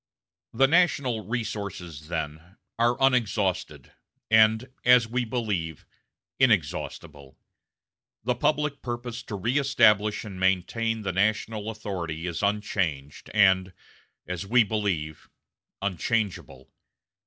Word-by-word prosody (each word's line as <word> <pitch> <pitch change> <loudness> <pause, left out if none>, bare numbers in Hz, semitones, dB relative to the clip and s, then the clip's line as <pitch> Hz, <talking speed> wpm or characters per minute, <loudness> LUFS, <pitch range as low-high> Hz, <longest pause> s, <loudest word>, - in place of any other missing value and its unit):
"The 135 +4 +4
national 140 - +2
resources, 100 -9 -5
then, 80 +2 -5 0.2
are 120 +1 +3
unexhausted, 100 - 0 0.4
and, 110 +2 +5 0.2
as 125 -2 +6
we 125 +2 -1
believe, 105 - -3 0.5
inexhaustible. 80 - -1 0.9
The 125 +2 +1
public 145 +3 0
purpose 120 -1 -5
to 110 -4 -6
reëstablish 115 -3 +3
and 95 -3 -8
maintain 110 +4 0
the 95 -2 -2
national 105 +2 0
authority 90 -7 -5
is 85 -2 -3
unchanged 95 -9 -2
and, 95 -2 +3 0.5
as 90 -2 -4
we 120 +4 +4
believe, 95 -8 -3 0.5
unchangeable. 90 - -2
105 Hz, 95 wpm, -26 LUFS, 90-120 Hz, 0.9 s, as